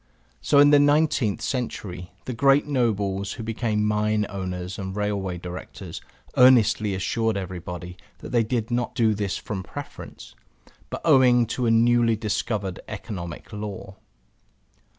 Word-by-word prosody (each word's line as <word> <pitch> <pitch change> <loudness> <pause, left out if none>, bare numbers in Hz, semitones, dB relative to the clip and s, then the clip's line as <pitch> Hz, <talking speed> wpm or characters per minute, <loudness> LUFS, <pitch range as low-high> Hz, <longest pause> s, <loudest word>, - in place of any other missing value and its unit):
So 145 - +2
in 145 +1 +7
the 145 - +7
nineteenth 145 -7 +2
century 95 -8 -4
the 130 - -4
great 135 +4 +4
nobles 105 -8 0
who 115 - -7
became 110 -1 -1
mine 105 0 +1
owners 90 -1 -5
and 95 0 -5
railway 100 -3 -2
directors 90 +1 -8 0.3
earnestly 115 -5 +5
assured 110 +3 0
everybody 90 -1 -6 0.2
that - - -10
they 120 -2 +3
did 115 0 -2
not 120 0 -1
do 115 -4 +3
this 100 -1 -2
from 100 -3 -5
preference, 140 +9 -9 0.6
but - - -5
owing 130 -6 +5
to 125 -2 -1
a - - +3
newly 115 0 +4
discovered 105 -3 -2
Economic 90 -3 -7
Law. 100 -2 -7
105 Hz, 135 wpm, -24 LUFS, 95-120 Hz, 0.6 s, in